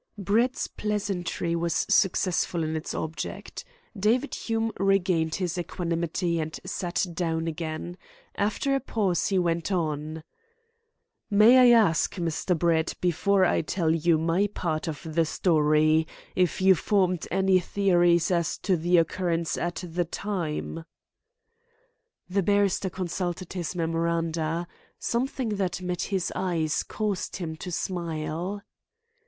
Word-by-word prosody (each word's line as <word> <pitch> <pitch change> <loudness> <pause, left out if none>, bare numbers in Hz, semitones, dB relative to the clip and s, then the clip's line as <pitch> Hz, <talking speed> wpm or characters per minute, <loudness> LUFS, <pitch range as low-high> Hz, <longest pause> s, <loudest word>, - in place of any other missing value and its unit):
Brett's 225 +6 +1
pleasantry 195 -5 -2
was 170 -1 0
successful 180 -3 +2
in 155 0 -2
its 155 - -4
object. 160 0 -5 0.3
David 235 +7 +1
Hume 225 0 -1
regained 185 -5 +2
his 180 -1 -2
equanimity 170 0 -2
and 155 0 -4
sat 175 +1 -1
down 165 -1 -1
again. 165 +2 -5 0.3
After 215 +7 0
a 275 - +2
pause 200 -9 0
he 195 - +1
went 170 0 0
on: 155 -3 -2 1.1
"May 215 +5 +7
I 235 - +8
ask, 165 -8 +2
Mr. 170 0 -1
Brett, 165 0 +1
before 185 +2 +2
I - - +2
tell 160 0 0
you 165 0 +3
my 165 +5 +1
part 165 -6 -3
of 155 -2 -5
the 165 +1 +2
story, 155 -1 +3 0.3
if 180 -2 +1
you 190 0 +7
formed 185 -1 +1
any 190 -1 +3
theories 175 -2 +2
as 170 -2 0
to 190 - +1
the 175 +2 +3
occurrence 170 -1 0
at 175 +1 -3
the 175 +1 -1
time?" 165 -3 -4 1.4
The 195 +2 +1
barrister 200 0 +2
consulted 180 0 -4
his 180 -1 -4
memoranda. 165 0 -1 0.3
Something 235 -3 -2
that 185 -3 -1
met 180 -1 -3
his 190 -3 -1
eyes 165 -5 0
caused 210 -3 -3
him 165 -3 -4
to 180 +3 -6
smile. 170 +2 -3
175 Hz, 125 wpm, -26 LUFS, 165-195 Hz, 1.4 s, I